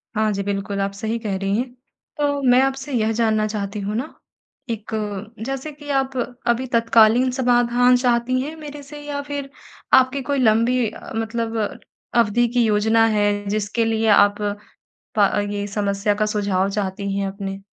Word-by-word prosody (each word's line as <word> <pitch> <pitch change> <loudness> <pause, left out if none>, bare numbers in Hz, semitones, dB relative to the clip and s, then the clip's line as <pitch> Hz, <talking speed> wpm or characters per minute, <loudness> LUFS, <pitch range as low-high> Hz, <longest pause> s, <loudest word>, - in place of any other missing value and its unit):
हाँ 215 0 +2
जी, 200 0 -2
बिल्कुल 200 0 -3
आप 195 0 -1
सही 220 +3 -3
कह 210 -4 -3
रही 195 +1 -1
हैं। 245 +1 -3 0.4
तो 285 -1 0
मैं 250 +1 +6
आपसे 270 +1 -1
यह 225 -2 +1
जानना 220 -1 +1
चाहती 210 -1 -4
हूँ 205 +2 -3
ना 260 +7 -3 0.6
एक 220 -1 -5
अ, 215 +1 -5
जैसे 270 +4 -4
कि 290 0 -12
आप 265 0 -1 0.3
अभी 240 +2 +2
तत्कालीन 230 +2 +5
समाधान 245 -1 +3
चाहती 245 0 +1
हैं 305 +4 -5
मेरे 295 -2 -9
से? 295 +1 -10
या 290 -1 -4
फिर 285 -1 -5 0.4
आपकी 260 +1 +5
कोई 280 +1 -1
लंबी 235 +1 +3
अ, - - -11
मतलब 225 0 -2 0.6
अवधि 235 +1 +3
की 245 -1 +3
योजना 220 +1 +3
है 205 0 +1
जिसके 215 +2 0
लिए 225 0 0
आप 205 0 +5 0.8
प 200 -1 +5 0.2
ये 205 0 -3
समस्या 200 0 0
का 215 +1 0
सुझाव 200 -2 0
चाहती 200 -1 -3
हैं 200 - -1
अपने? 195 0 -6
225 Hz, 170 wpm, -21 LUFS, 205-255 Hz, 0.8 s, मैं